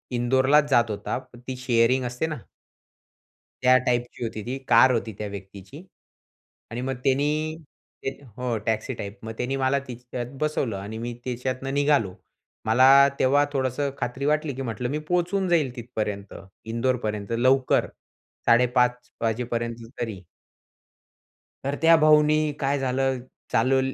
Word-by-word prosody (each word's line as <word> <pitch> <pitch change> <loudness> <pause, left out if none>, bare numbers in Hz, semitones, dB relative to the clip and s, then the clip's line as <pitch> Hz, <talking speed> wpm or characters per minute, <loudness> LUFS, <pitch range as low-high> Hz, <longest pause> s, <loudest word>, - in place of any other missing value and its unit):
इंदोरलाच 130 +4 +3
जात 120 -4 +3
होता. 105 0 -3 0.2
ती 125 +2 -7
शेअरिंग 125 0 +2
असते 125 +5 -2
ना 155 -3 -4 1.3
त्या 130 0 +6
टाइपची 120 0 -1
होती 110 -2 -4
ती. 130 +2 -3
कार 125 +2 +6
होती 115 -2 -1
त्या 105 - -4
व्यक्तीची. 100 - -10 0.9
आणि 120 +2 -4
मग 135 +1 -2
त्यांनी 150 +3 +1 0.5
ते 135 - +2 0.3
हो, 125 -2 -1
टॅक्सी 110 +3 -1
टाइप. 105 -1 -7
मग 110 - -4
त्यांनी 130 +2 -1
मला 135 +1 +2
तिच्यात 125 +1 -7
बसवलं 150 -7 0
आणि 105 +3 -6
मी 120 +1 -4
त्याच्यातनं 130 +2 -3
निघालो. 140 -9 +2 0.5
मला 125 +4 +5 0.3
तेव्हा 140 +3 +4
थोडंसं 135 +1 0
खात्री 125 +3 -3
वाटली, 150 0 +1
की 135 - -5
म्हटलं, 120 -1 -3
"मी 145 - -1
पोहचून 180 +3 +1
जाईल 150 -8 +2
तिथपर्यंत, 105 -5 -4 0.4
इंदोरपर्यंत 115 -4 -1
लवकर 130 +2 +3 0.6
5:30 125 +1 +3
वाजेपर्यंत 115 0 -2
तरी." 105 -6 -5 1.4
तर 140 +1 -1
त्या 165 0 +7
भाऊनी 155 0 +4
काय 140 +1 0
झालं 130 0 0 0.3
चालव 130 +4 +3
125 Hz, 135 wpm, -25 LUFS, 115-135 Hz, 1.4 s, त्या